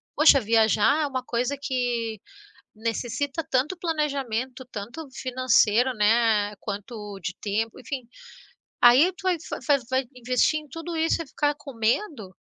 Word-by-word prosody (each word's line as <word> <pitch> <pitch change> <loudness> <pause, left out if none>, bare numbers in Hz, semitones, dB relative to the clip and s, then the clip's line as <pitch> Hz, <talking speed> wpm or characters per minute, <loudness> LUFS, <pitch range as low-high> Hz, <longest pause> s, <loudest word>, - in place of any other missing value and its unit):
poxa, 300 -2 +7
viajar 225 +6 +3
é - - 0
uma 260 -2 -3
coisa 250 +3 -1
que 240 -5 -2 0.6
necessita 245 +7 -3
tanto 275 +8 0
planejamento, 275 -7 -2
tanto 240 +10 -7
financeiro, 255 -2 +2
né. 210 -1 +2
Quanto 205 0 -6
de 180 - -4
tempo, 220 +2 -2
enfim, 260 -2 -6 0.7
aí 260 +10 +7
tu 375 - -15
vai 370 -2 +2
fa - - -4
vai 285 -2 +4
vai 260 +1 +1
investir 250 +5 +1
em 305 - -14
tudo 330 +4 -6
isso 325 +1 +1
e - - -18
ficar 290 +1 0
com 275 -2 -10
medo? 230 - -1
250 Hz, 145 wpm, -25 LUFS, 225-290 Hz, 0.7 s, poxa